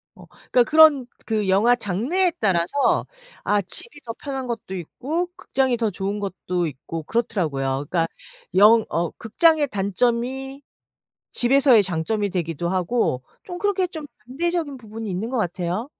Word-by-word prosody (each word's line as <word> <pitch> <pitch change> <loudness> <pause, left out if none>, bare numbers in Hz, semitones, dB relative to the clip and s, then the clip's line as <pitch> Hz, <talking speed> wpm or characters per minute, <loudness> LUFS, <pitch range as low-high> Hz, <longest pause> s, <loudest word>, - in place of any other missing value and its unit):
어 - - -14
그러니까 245 - 0
그런 305 -3 +6 0.2
그 215 -3 -1
영화 220 +6 +4
장르에 245 - 0
따라서 190 +6 +1 0.4
아 205 0 +2
집이 290 - -7
더 230 - -5
편한 270 -2 -5
것도 220 -5 -5
있고 295 - -3
극장이 260 -3 0
더 225 -3 0
좋은 195 +3 -3
것도 180 -3 -2
있고 155 +3 -7
그렇더라고요. 145 - -1
그러니까 165 -2 +1 0.5
영 215 +3 +6
어 170 0 -1
극장의 300 +6 +3
단점이 245 +7 -1 0.7
집에서의 250 -3 +5
장점이 195 +4 -1
되기도 170 -1 -2
하고 185 - 0 0.2
좀 355 -1 -7
그렇게 405 -3 +1
좀 315 -4 -8 0.2
반대적인 320 0 -2
부분이 220 -2 -7
있는 195 +6 -3
것 260 - -2
같아요. 180 - -2
225 Hz, 315 characters per minute, -23 LUFS, 185-270 Hz, 0.7 s, 그런